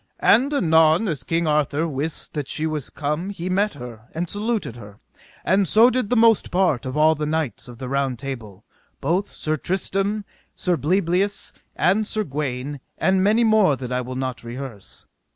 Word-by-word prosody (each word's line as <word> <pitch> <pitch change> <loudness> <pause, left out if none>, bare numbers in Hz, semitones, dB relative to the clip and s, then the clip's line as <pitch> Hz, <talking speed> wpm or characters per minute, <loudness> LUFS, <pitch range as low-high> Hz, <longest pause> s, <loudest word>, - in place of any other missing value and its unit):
And 265 +5 +5
anon 160 - +4
as 155 -8 -3
King 165 0 0
Arthur 150 +1 +1
wist 150 +1 -4
that 145 -3 -3
she 155 +3 -2
was 155 -3 -3
come 150 +5 -3
he 185 -2 -4
met 200 0 +1
her 120 -4 -10
and 175 +2 -2
saluted 210 - -2
her, 105 -3 -12 0.5
and 190 +1 +3
so 225 +8 +6
did 250 -5 -1
the 250 - +2
most 225 -2 +4
part 170 -9 +1
of 130 - -4
all 155 +1 +5
the 150 -1 -3
knights 155 -6 -2
of 120 -1 -11
the 130 +1 -6
Round 135 -1 -1
Table, 110 -6 -7 0.3
both 185 +4 0
Sir 155 0 -2
Tristram, 195 +4 -1 0.3
Sir 180 -1 0
Bleoberis, 185 +4 0 0.2
and 205 +4 +2
Sir 215 0 0
Gawaine, 140 -3 -4 0.2
and 190 0 +2
many 215 +4 +4
more 215 -9 +4
that 125 -1 -7
I 125 0 0
will 125 +1 -6
not 130 -2 -4
rehearse. 115 - -8
155 Hz, 180 wpm, -22 LUFS, 135-195 Hz, 0.5 s, so